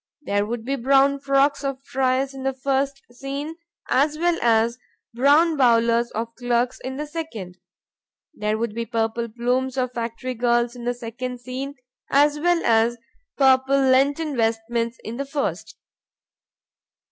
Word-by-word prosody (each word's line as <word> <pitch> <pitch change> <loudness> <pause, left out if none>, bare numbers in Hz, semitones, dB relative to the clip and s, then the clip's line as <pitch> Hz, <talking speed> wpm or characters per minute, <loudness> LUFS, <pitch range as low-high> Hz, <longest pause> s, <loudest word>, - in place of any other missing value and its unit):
There 205 -4 0
would 230 0 -4
be 275 +2 -1
brown 275 +2 +3
frocks 275 +1 +2
of 275 -1 -3
friars 265 0 0
in 270 - -8
the 270 0 -1
first 275 +1 -1
scene 280 +5 -5 0.3
as 295 +3 +2
well 345 +1 +1
as 230 +1 +2 0.3
brown 295 +6 +4
bowlers 235 -2 +3
of 230 +1 -4
clerks 245 0 0
in 260 +1 -5
the 300 - -3
second. 230 - -7 0.7
There 210 -5 -1
would 230 -1 -2
be 230 +1 -4
purple 230 0 -1
plumes 250 +3 -1
of 255 -1 -1
factory 235 +2 -4
girls 240 0 +1
in 240 -1 -8
the 245 0 0
second 245 +1 -6
scene 260 +3 -6 0.3
as 290 +1 +3
well 345 +1 +2
as 230 +1 +3 0.4
purple 265 0 +4
lenten 275 +3 +2
vestments 230 +1 -1
in 225 +2 -6
the 280 - -3
first. 280 0 -3
255 Hz, 145 wpm, -23 LUFS, 235-275 Hz, 0.7 s, brown